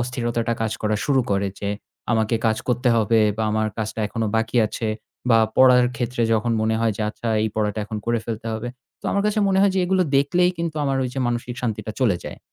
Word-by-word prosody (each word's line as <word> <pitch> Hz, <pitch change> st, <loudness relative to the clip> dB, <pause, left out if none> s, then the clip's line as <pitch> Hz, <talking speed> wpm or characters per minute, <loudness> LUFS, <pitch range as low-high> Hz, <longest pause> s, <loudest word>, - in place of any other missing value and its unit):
অস্থিরতাটা 120 Hz, -1 st, -1 dB
কাজ 110 Hz, -, -1 dB
করা 105 Hz, 0 st, +1 dB
শুরু 135 Hz, -3 st, +3 dB
করে 100 Hz, 0 st, +1 dB
যে, 100 Hz, -, -2 dB, 0.4 s
আমাকে 110 Hz, 0 st, +1 dB
কাজ 110 Hz, 0 st, +2 dB
করতে 125 Hz, +1 st, +1 dB
হবে 115 Hz, 0 st, +3 dB, 0.2 s
বা 110 Hz, -, -1 dB
আমার 110 Hz, 0 st, +1 dB
কাজটা 110 Hz, 0 st, -3 dB
এখনও 110 Hz, +1 st, -2 dB
বাকি 110 Hz, +2 st, -1 dB
আছে। 110 Hz, +1 st, -4 dB, 0.4 s
বা 115 Hz, -, +6 dB, 0.2 s
পড়ার 125 Hz, -1 st, +6 dB
ক্ষেত্রে 120 Hz, 0 st, -2 dB
যখন 115 Hz, +1 st, +1 dB
মনে 110 Hz, 0 st, +1 dB
হয় 115 Hz, -1 st, +2 dB
যে 110 Hz, -, -2 dB
আচ্ছা 115 Hz, +2 st, -5 dB
এই 110 Hz, -, +1 dB
পড়াটা 105 Hz, 0 st, 0 dB
এখন 110 Hz, +1 st, -6 dB
করে 120 Hz, 0 st, +1 dB
ফেলতে 115 Hz, -1 st, -5 dB
হবে। 110 Hz, +2 st, -4 dB, 0.3 s
তো -, -, -30 dB
আমার 200 Hz, -, +1 dB
কাছে 210 Hz, +1 st, 0 dB
মনে 190 Hz, -1 st, +2 dB
হয় 200 Hz, -1 st, +4 dB
যে -, -, +1 dB
এগুলো 185 Hz, +1 st, +2 dB
দেখলেই 175 Hz, +6 st, +3 dB
কিন্তু 165 Hz, -2 st, -3 dB
আমার 135 Hz, -1 st, 0 dB
ওই 130 Hz, -, -1 dB
যে -, -, -3 dB
মানসিক 120 Hz, +1 st, -2 dB
শান্তিটা 110 Hz, -2 st, -3 dB
চলে 110 Hz, -8 st, +3 dB
যায়। -, -, -7 dB
115 Hz, 220 wpm, -22 LUFS, 110-130 Hz, 0.4 s, বা